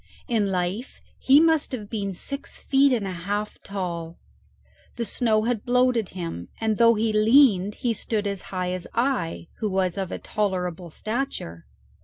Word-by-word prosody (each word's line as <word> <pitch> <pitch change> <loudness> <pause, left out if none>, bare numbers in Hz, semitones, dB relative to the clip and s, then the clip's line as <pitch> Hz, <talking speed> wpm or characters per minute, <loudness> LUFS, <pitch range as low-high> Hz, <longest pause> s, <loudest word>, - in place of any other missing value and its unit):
In 225 -6 +1
life 185 +7 -2 0.2
he 270 +2 +6
must 320 -3 +3
have 215 -5 -4
been 200 -2 -3
six 280 +9 -4
feet 275 0 +3
and 230 -5 +1
a 190 - -3
half 200 +4 -4
tall. 170 -4 -5 0.8
The 235 - -2
snow 215 0 +1
had 230 -2 -1
bloated 250 -4 +2
him, 165 - -5
and 220 -2 0
though 230 0 +6
he 220 0 0
leaned 215 -3 +5
he 240 -2 0
stood 215 -1 -2
as 200 -2 -2
high 180 -1 -2
as 180 -1 -4
I, 235 -10 0
who 215 - -1
was 190 -1 0
of 190 -2 -3
a - - -3
tolerable 180 -4 -2
stature. 215 - -4
210 Hz, 165 wpm, -25 LUFS, 185-240 Hz, 0.8 s, he